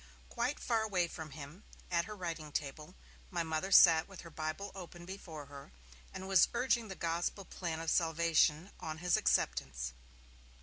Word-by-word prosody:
Quite 245 +4 -1
far 230 -2 +1
away 190 -5 +1
from 160 -2 -7
him, 150 +7 -10 0.3
at 170 -1 +2
her 215 - -7
writing 165 -5 -5
table, 150 +5 -4 0.3
my 175 -3 -1
Mother 160 +4 -2
sat 165 -4 +8
with 195 -2 -10
her 170 - -11
Bible 155 +6 -4
open 175 -2 -9
before 175 -5 -8
her, 140 - -12 0.4
and 190 - -7
was 195 -2 +6
urging 240 -2 +2
the 190 - -6
gospel 170 +4 -2
plan 165 -2 -4
of 165 0 -1
salvation 165 0 +3
on 155 0 -5
his 175 +1 +2
acceptance. 60 -2 0
170 Hz, 165 wpm, -34 LUFS, 155-190 Hz, 0.4 s, sat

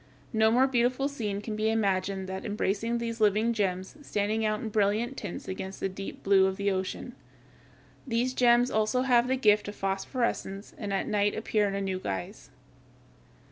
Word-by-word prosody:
No 220 0 +4
more 250 +4 +4
beautiful 255 +1 +1
scene 210 -8 -3
can 215 0 -4
be 215 +1 +1
imagined 195 -3 0
than 190 0 -4
that - - -14
embracing 215 +2 -1
these 230 -1 -4
living 215 +3 +3
gems, 190 +1 -2
standing 215 -4 -1
out 215 -1 +1
in 220 - -4
brilliant 215 +4 +1
tints 205 -8 -6
against 190 0 -5
the - - 0
deep 195 +1 -8
blue 195 -1 +5
of 190 0 -3
the 200 0 +1
ocean. 190 0 -3 0.9
These 245 +1 0
gems 245 0 +4
also 220 +4 +1
have 245 -2 +4
the 260 - +2
gift 210 -5 +3
of 205 - -6
phosphorescence 195 0 -2
and 205 -3 -5
at 195 - -1
night 205 -1 +1
appear 215 -1 +1
in 195 - -2
a 200 - -2
new 190 -1 -2
guise. 95 - -5
210 Hz, 180 wpm, -28 LUFS, 195-235 Hz, 0.9 s, blue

